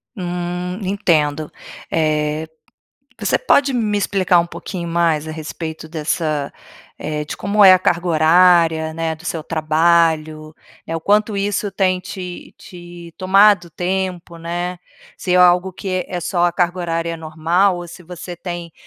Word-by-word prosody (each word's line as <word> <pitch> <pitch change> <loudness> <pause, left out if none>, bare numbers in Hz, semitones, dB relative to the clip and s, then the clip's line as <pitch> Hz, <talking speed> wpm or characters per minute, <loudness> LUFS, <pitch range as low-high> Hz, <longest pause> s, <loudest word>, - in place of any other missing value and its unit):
Hum, 180 +1 -4
entendo. 155 -6 0 0.4
Eh, 155 0 0 0.7
você - - +1
pode 280 - +3
me 215 -4 0
explicar 190 -3 +2
um 170 - -3
pouquinho 170 0 -6
mais 165 -2 +1
a - - -4
respeito 160 0 -7
dessa 155 -2 -2 0.5
eh, 150 -1 -3
de - - -6
como 205 +2 +3
é 190 - +10
a 185 - +6
carga 175 -1 0
horária, 165 0 +4
né, 165 0 -2
do 160 +3 -16
seu 165 -3 -4
trabalho? 155 -1 +1 0.3
Eh, 165 - -4
o - - -5
quanto 210 +3 +2
isso 200 +1 -1
tem 185 -2 +1
te 185 -2 -8
te 175 -1 -12
tomado 195 -1 +4
tempo, 180 0 -3
né? 175 +2 -4 0.4
Se 180 - -2
é - - +4
algo 180 +1 +4
que 185 0 -3
é 180 - -3
só 175 +1 0
a 175 - +2
carga 175 +1 0
horária 165 -1 -2
normal 165 +4 +1
ou 175 0 -7
se 175 +2 -12
você 175 +1 -8
tem 175 -1 -6
175 Hz, 155 wpm, -19 LUFS, 160-185 Hz, 0.7 s, é